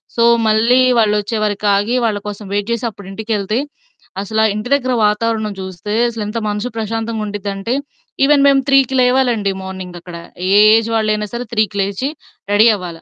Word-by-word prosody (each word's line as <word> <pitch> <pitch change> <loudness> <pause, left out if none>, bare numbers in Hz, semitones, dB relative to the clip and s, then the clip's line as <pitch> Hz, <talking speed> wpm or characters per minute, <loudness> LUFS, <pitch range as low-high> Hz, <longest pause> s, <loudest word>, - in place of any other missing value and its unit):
So, 235 - +2 0.2
మళ్ళీ 225 +4 +3 0.2
వాళ్ళు 210 -1 +3
వచ్చేవారికి 210 -1 -2
ఆగి, 210 +5 0
వాళ్ళ 210 -2 0
కోసం 205 0 -7
వెయిట్ 205 +2 -2
చేసి 235 +1 -2
అప్పుడు 200 -2 -13
ఇంటికెళ్తే, 215 +1 -2 0.6
అసలా 220 +2 0
ఇంటి 215 +3 -5
దగ్గర 255 -2 +1 0.2
వాతావరణం 215 0 -1
చూస్తే 190 +2 -6 0.2
అసలెంత 220 -1 -5
మనసు 210 +4 -3
ప్రశాంతంగా 225 0 -3
ఉండిద్దంటే, 205 +2 -4 0.5
ఈవెన్ 285 0 +4
మేము 275 -1 +4
3కి 270 -1 +3
లేవాలండి 250 -5 +2
మార్నింగ్ 185 -2 -7
అక్కడ. 175 0 -11 0.4
ఏ - - +5 0.2
ఏజ్ 225 0 +1
వాళ్ళైనా 215 -1 0
సరే 245 +1 -4
3కి 215 -2 0
లేచి 200 +7 -2 0.4
రెడీ 215 +3 +5
అవ్వాలా. 175 -4 -8
215 Hz, 155 wpm, -17 LUFS, 205-230 Hz, 0.6 s, ఏ